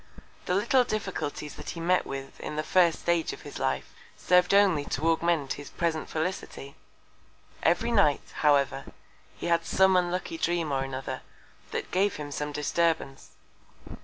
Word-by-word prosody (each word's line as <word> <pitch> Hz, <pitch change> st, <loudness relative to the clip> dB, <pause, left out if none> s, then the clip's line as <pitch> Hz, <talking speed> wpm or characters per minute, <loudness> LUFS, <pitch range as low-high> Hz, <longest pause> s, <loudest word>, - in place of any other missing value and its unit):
The 180 Hz, -, +1 dB
little 240 Hz, +6 st, +3 dB
Difficulties 195 Hz, -10 st, -4 dB
that -, -, -7 dB
he 170 Hz, -, -5 dB
met 180 Hz, +2 st, +2 dB
with 135 Hz, 0 st, -7 dB
in -, -, -5 dB
the 155 Hz, -, -1 dB
first 175 Hz, -2 st, +3 dB
Stage 170 Hz, -1 st, +1 dB
of -, -, -11 dB
his -, -, -8 dB
Life, 65 Hz, 0 st, -2 dB, 0.2 s
serv'd 180 Hz, -1 st, +3 dB
only 195 Hz, -7 st, +4 dB
to 160 Hz, +3 st, 0 dB
augment 165 Hz, -4 st, +1 dB
his 145 Hz, -, -10 dB
present 165 Hz, -2 st, -2 dB
Felicity. 155 Hz, -4 st, -4 dB, 0.9 s
Every 175 Hz, +8 st, +2 dB
Night, 200 Hz, -11 st, +2 dB
however, 145 Hz, -3 st, +2 dB, 0.5 s
he -, -, -6 dB
had 170 Hz, -1 st, +2 dB
some 190 Hz, 0 st, +3 dB
unlucky 180 Hz, -, 0 dB
Dream 170 Hz, -, 0 dB
or 135 Hz, -1 st, 0 dB
another, 135 Hz, 0 st, -5 dB, 0.5 s
that -, -, -4 dB
gave 195 Hz, +2 st, +2 dB
him 145 Hz, -1 st, -6 dB
some 150 Hz, +1 st, -3 dB
Disturbance. 150 Hz, -1 st, -1 dB
170 Hz, 155 wpm, -28 LUFS, 145-185 Hz, 0.9 s, only